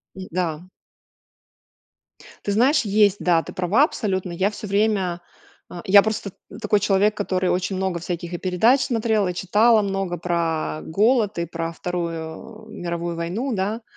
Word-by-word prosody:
Н-да. 180 -3 -4 1.8
Ты 205 - -1
знаешь, 255 +8 +3
есть. 205 -2 +3
Да, 170 -2 +2
ты - - -9
права 185 +9 +2
абсолютно. 190 - -1
Я 190 +4 0
всё 210 - -8
время. 200 -4 0 0.5
Э, 175 - -8
я 200 +1 +7
просто 215 -1 -3
т - - -37 0.3
такой 210 -1 +2
человек, 200 +2 +2
который 185 -2 -1
очень 185 +2 -1
много 185 -2 -2
всяких 175 0 -5
и 175 - -2
передач 220 +10 +3
смотрела, 220 -5 0
и - - -2
читала 210 +5 +3
много 195 -3 -2
про 165 -2 -2
голод, 215 +3 +1
и 170 - -1
про 165 0 -4
Вторую 175 +6 -6
м 215 - -10
Мировую 170 0 -3
войну, 190 +11 -3
да, 210 +3 -2
190 Hz, 155 wpm, -22 LUFS, 175-215 Hz, 1.8 s, я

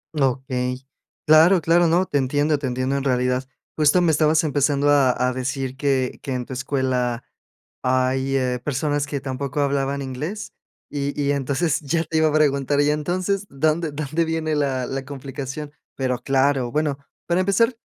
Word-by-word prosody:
Okey, 130 -1 -1 0.4
claro, 160 +4 +6
claro. 165 +2 +3
No, 175 +3 +3
te 145 - 0
entiendo, 145 +3 +1
te 135 - -3
entiendo 130 +2 -1
en 140 - -1
realidad. 125 0 0 0.3
Justo 155 +3 +4
me 175 -2 +3
estabas 155 +1 +3
empezando 145 -1 +2
a 140 -3 +4 0.2
a 125 - 0
decir 130 +1 -3
que 135 -2 0
que 135 - -4
en 125 -1 -3
tu 130 - -8
escuela 130 -2 -1 0.6
hay, 130 +1 +1
eh, 125 -1 -1
personas 145 0 -1
que 140 -2 -4
tampoco 135 +1 -3
hablaban 140 0 0
inglés, 155 +12 -5 0.4
y 145 0 -3
y 140 0 +1
entonces 140 +3 0
ya 165 +3 0
te 160 - -2
iba 160 - +4
a - - -3
preguntar, 145 -2 +2
y 145 - +2
entonces, 185 +6 -1
¿dónde, 155 +3 0
dónde 155 +3 -1
viene 160 -1 -1
la 135 -4 0
la 135 0 -4
complicación? 140 +1 -6 0.2
Pero 125 -2 -1
claro, 135 -2 +1
bueno, 150 -2 -1 0.3
para 175 +1 +1
empezar, 230 +6 +2
140 Hz, 170 wpm, -22 LUFS, 130-155 Hz, 0.6 s, claro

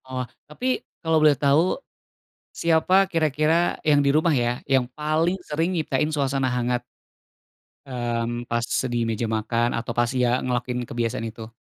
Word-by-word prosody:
Oh. 130 -1 -3 0.2
Tapi 250 +12 -1 0.2
kalo 160 -1 +1
boleh 150 -2 +5
tahu, 145 +6 +3 0.7
siapa 170 +4 +3
kira-kira 160 +1 +1
yang 145 -2 +5
di 140 - +3
rumah 155 +1 +3
ya, 120 -1 0
yang 130 -2 +2
paling 155 +4 0
sering 160 +4 0
nyiptain 150 -2 0
suasana 135 -3 0
hangat? 125 0 -1 1.0
Mmm, 120 -2 -3
pas 120 0 -1 0.3
di - - 0
meja 115 +1 -1
makan 115 +2 0
atau 115 0 -4
pas 120 -1 +2
ya 125 0 +3
ngelakuin 125 0 -1
kebiasaan 115 -1 -2
itu? 110 0 -10
135 Hz, 145 wpm, -24 LUFS, 120-155 Hz, 1.0 s, boleh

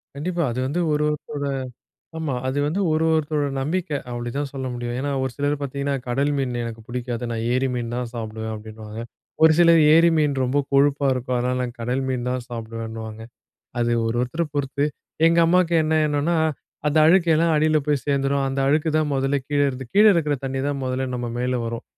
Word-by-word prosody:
கண்டிப்பா, 170 +4 -2
அது 120 - -3
வந்து, 145 +7 -1
ஒரு 150 0 +1
ஒருத்தரோட 150 -1 -4 0.7
ஆமா. 160 -4 -2
அது 135 +2 -1
வந்து, 175 +7 -1
ஒரு 155 +1 +1
ஒருத்தரோட 150 -2 0
நம்பிக்க. 175 +6 -2 0.2
அப்படிதான் 120 +4 -3
சொல்ல 135 -1 -4
முடியும். 120 0 -4
ஏன்னா, 145 +2 -2
ஒரு 130 - -2
சிலர 145 0 +1
பார்த்தீங்கன்னா, 140 0 -2
"கடல் 140 +4 +1
மீன் 130 -3 -1
எனக்கு 115 -1 -6
புடிக்காது. 120 -1 -4
நான் 115 -1 -2
ஏரி 130 +1 +1
மீன் 120 -1 -3
தான் 125 -1 -3
சாப்பிடுவேன்." 110 -1 -5
அப்டின்னுவாங்க. 110 0 -9 0.4
ஒரு 160 0 +8
சிலர், 170 -1 +6
"ஏரி 165 +1 +6
மீன் 150 -2 +2
ரொம்ப 130 +3 0 0.2
கொழுப்பா 140 0 +3
இருக்கும். 125 0 -2
அதனால 125 +1 0
நான் 120 -1 -5
கடல் 125 +3 -1
மீன் 125 -1 -2
தான் 125 -1 -2
சாப்டுவேனுவாங்க. 115 -2 -6 0.6
அது 120 0 +1
ஒரு 115 +1 -1
ஒருத்தர 130 +7 -1
பொறுத்து, 140 0 0 0.4
எங்க 170 +1 +3
அம்மாக்கு 175 0 +3
என்ன 155 +1 +1
எண்ணம்னா, 150 +3 0 0.5
அந்த 150 +1 +2
அழுக்கு 175 +1 +4
எல்லாம் 165 +1 +3
அடில 155 +1 +3
போய் 145 -4 0
சேர்ந்துரும். 140 0 +1
அந்த 135 +1 -2
அழுக்கு 150 +3 +2
தான், 155 -1 +1
மொதல்ல 135 +1 +1
கீழே 145 -1 +2
இருந்து 130 0 -6
கீழே 210 +2 +7
இருக்கிற 150 -4 +1
தண்ணி 135 0 -2
தான், 145 -1 -2
மொதல்ல 130 +1 -2
நம்ம 120 -1 -3
மேல 125 0 0
வரும். 115 +1 -4
135 Hz, 190 wpm, -23 LUFS, 120-150 Hz, 0.7 s, ஒரு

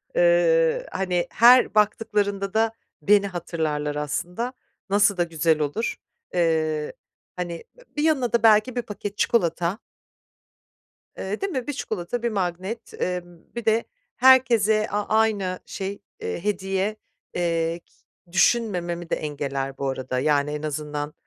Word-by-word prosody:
Eee, - - +3
hani, 180 -2 -1
her 245 0 +6
baktıklarında 205 -2 +1
da 225 0 +2 0.3
beni 200 0 +4
hatırlarlar 160 -5 -2
aslında. 175 - -3 0.4
Nasıl 200 -1 +3
da 175 - +3
güzel 165 -1 +1
olur. 150 +10 -1 0.4
Eee, 160 -3 0 0.4
hani, 175 -2 -5
b - - -17 0.2
bir 295 - +1
yanına 270 -7 +1
da 235 -1 +2
belki 220 +3 +5
bir 245 - 0
paket 205 -1 -7
çikolata. 175 -3 +1 1.4
Eee, 200 +3 -4
değil 395 - -1
mi? 260 -5 -3
1 290 - -2
çikolata, 220 -1 -4
1 235 - +1
magnet, 195 +3 -3
emm, 175 -1 -3 0.2
bir 235 - -5
de 225 +1 +3 0.3
herkese 230 -4 +5
a 205 0 -1
aynı 210 -4 +1
şey, 195 +1 -5 0.2
eee, 170 - -4
hediye. 195 0 -1 0.4
Eee, 170 -1 0
ki - - -32 0.4
düşünmememi 175 -4 +1
de - - +1
engeller 140 -2 -4
bu 140 - -1
arada, 130 -1 -3
yani, 145 +1 +2
en 150 0 -4
azından 150 0 -4
195 Hz, 135 wpm, -24 LUFS, 165-225 Hz, 1.4 s, her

